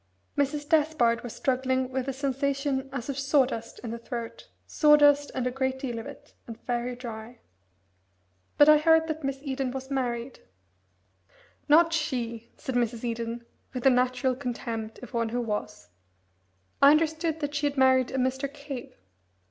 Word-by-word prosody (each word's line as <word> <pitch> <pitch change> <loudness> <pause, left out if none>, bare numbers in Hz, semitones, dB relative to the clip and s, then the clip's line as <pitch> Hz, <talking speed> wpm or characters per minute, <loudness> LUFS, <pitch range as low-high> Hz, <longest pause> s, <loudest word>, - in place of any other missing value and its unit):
Mrs. 290 +1 -1
Despard 295 -7 +2
was 240 - -7
struggling 260 0 0
with 260 0 -2
a - - 0
sensation 275 0 -1
as 250 -3 -5
of 275 -1 -3
sawdust 270 -4 +1
in 230 - -4
the 235 - -5
throat 235 0 -7 0.2
sawdust, 290 -1 +5
and 255 -2 -1
a 250 - 0
great 265 0 -1
deal 245 -3 -4
of 225 - -7
it, 280 - -12
and 230 -1 -8
very 245 0 -2
dry. 235 -1 -8 1.2
"But 290 - +7
I 305 0 +8
heard 320 +1 +4
that 315 -1 -4
Miss 275 0 -2
Eden 270 -2 -2
was 265 +1 -6
married 245 -2 -2 0.7
" 95 - -33
"Not 330 +2 +6
she!" 240 -8 -2
said 265 -4 -5
Mrs. 235 -1 -1
Eden, 235 0 -4 0.3
with 250 - -3
the 270 - +6
natural 255 +1 +1
contempt 235 -4 -5
of - - -10
one 230 -1 0
who 245 +2 -2
was. 210 - -4 0.9
"I 280 - +9
understood 320 +1 +2
that 290 0 -2
she 290 0 +1
had 285 0 -4
married 260 -1 +4
a 265 - -3
Mr. 265 +2 -1
Cave." 280 -3 -8
260 Hz, 165 wpm, -27 LUFS, 240-285 Hz, 1.2 s, I